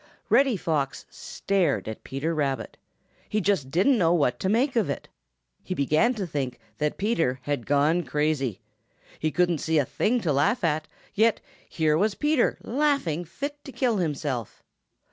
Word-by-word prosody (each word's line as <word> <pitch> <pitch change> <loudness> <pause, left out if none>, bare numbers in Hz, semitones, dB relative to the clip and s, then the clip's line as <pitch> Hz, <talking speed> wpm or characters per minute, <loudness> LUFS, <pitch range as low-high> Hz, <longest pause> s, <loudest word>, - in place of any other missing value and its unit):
Reddy 270 -5 +4
Fox 150 -6 -2
stared 195 - -1
at 110 - -6
Peter 140 +5 -2
Rabbit. 140 -4 -2 0.5
He 215 - +1
just 190 -9 0
didn't 200 - +3
know 170 -1 +4
what 140 -7 +1
to 190 - -1
make 245 +6 +2
of 220 -9 +2
it. 140 - -4 0.6
He 185 - -4
began 155 - +2
to 205 -4 -3
think 135 -6 -3 0.2
that 150 0 -1
Peter 170 - +1
had 145 -5 -3
gone 145 +5 +3
crazy. 150 - -1 0.6
He 155 - 0
couldn't 175 -1 +1
see 160 +2 0
a 145 - +3
thing 215 - 0
to 160 -7 +1
laugh 150 - +2
at, 155 -1 0 0.3
yet 220 +2 +3 0.3
here 155 -1 +1
was 205 +1 +1
Peter 295 -4 +2
laughing 250 - 0
fit 285 - -6
to 270 - -9
kill 245 -2 +1
himself. 145 - -3
165 Hz, 165 wpm, -26 LUFS, 145-220 Hz, 0.6 s, Reddy